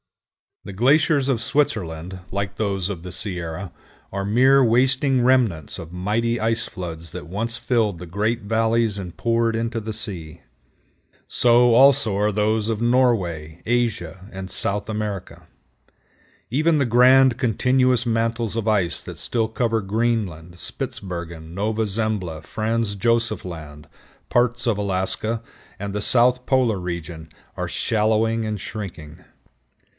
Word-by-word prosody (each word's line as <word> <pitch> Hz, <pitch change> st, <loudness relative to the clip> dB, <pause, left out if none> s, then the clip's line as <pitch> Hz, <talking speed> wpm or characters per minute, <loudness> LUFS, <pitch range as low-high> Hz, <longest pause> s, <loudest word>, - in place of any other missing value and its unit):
The 100 Hz, -, -8 dB
glaciers 140 Hz, +5 st, +3 dB
of 125 Hz, -5 st, +1 dB
Switzerland, 95 Hz, -, -1 dB
like 100 Hz, 0 st, -3 dB
those 100 Hz, -3 st, -1 dB
of 95 Hz, -5 st, -5 dB
the 90 Hz, +1 st, -8 dB
Sierra, 90 Hz, -1 st, -3 dB, 0.4 s
are 100 Hz, 0 st, -3 dB
mere 130 Hz, +6 st, +5 dB
wasting 130 Hz, +2 st, +3 dB
remnants 120 Hz, -, +2 dB
of 80 Hz, 0 st, -9 dB
mighty 110 Hz, +6 st, -1 dB
ice 115 Hz, +1 st, 0 dB
floods 85 Hz, -4 st, -7 dB
that 90 Hz, -, -7 dB
once 110 Hz, +6 st, -3 dB
filled 110 Hz, -8 st, 0 dB
the 90 Hz, -, -8 dB
great 105 Hz, +7 st, -1 dB
valleys 115 Hz, 0 st, +1 dB
and 90 Hz, -3 st, -7 dB
poured 115 Hz, -1 st, +1 dB
into 115 Hz, 0 st, -2 dB
the 110 Hz, 0 st, -5 dB
sea. 85 Hz, -7 st, -4 dB, 0.9 s
So, 120 Hz, 0 st, +4 dB
also, 130 Hz, -4 st, +5 dB
are 105 Hz, +1 st, +1 dB
those 105 Hz, +1 st, +1 dB
of 110 Hz, -2 st, -1 dB
Norway, 95 Hz, -11 st, +1 dB
Asia, 100 Hz, -7 st, -1 dB
and 95 Hz, -1 st, -7 dB
South 100 Hz, +2 st, -1 dB
America. 100 Hz, -6 st, -5 dB, 1.0 s
Even 155 Hz, +5 st, +3 dB
the 140 Hz, -, +2 dB
grand 125 Hz, +1 st, +5 dB
continuous 125 Hz, 0 st, +2 dB
mantles 115 Hz, -1 st, -1 dB
of 115 Hz, -1 st, -2 dB
ice 95 Hz, -6 st, +1 dB
that -, -, -9 dB
still 115 Hz, -2 st, -1 dB
cover 115 Hz, 0 st, 0 dB
Greenland, 100 Hz, -6 st, -2 dB
Spitsbergen, 85 Hz, -3 st, -6 dB
Nova 110 Hz, +2 st, 0 dB
Zembla, 100 Hz, -6 st, -2 dB
Franz 110 Hz, +3 st, -1 dB
Joseph 115 Hz, -1 st, +1 dB
Land, 75 Hz, -3 st, -9 dB, 0.4 s
parts 120 Hz, 0 st, +1 dB
of 110 Hz, -3 st, +2 dB
Alaska, 100 Hz, +3 st, -1 dB, 0.4 s
and 100 Hz, 0 st, -4 dB
the 105 Hz, -, -2 dB
south 125 Hz, +3 st, +3 dB
polar 125 Hz, -6 st, +2 dB
region 85 Hz, -2 st, -6 dB, 0.3 s
are -, -, -2 dB
shallowing 110 Hz, +1 st, +1 dB
and 105 Hz, -1 st, -3 dB
shrinking. 90 Hz, -5 st, -8 dB
110 Hz, 135 wpm, -22 LUFS, 95-120 Hz, 1.0 s, mere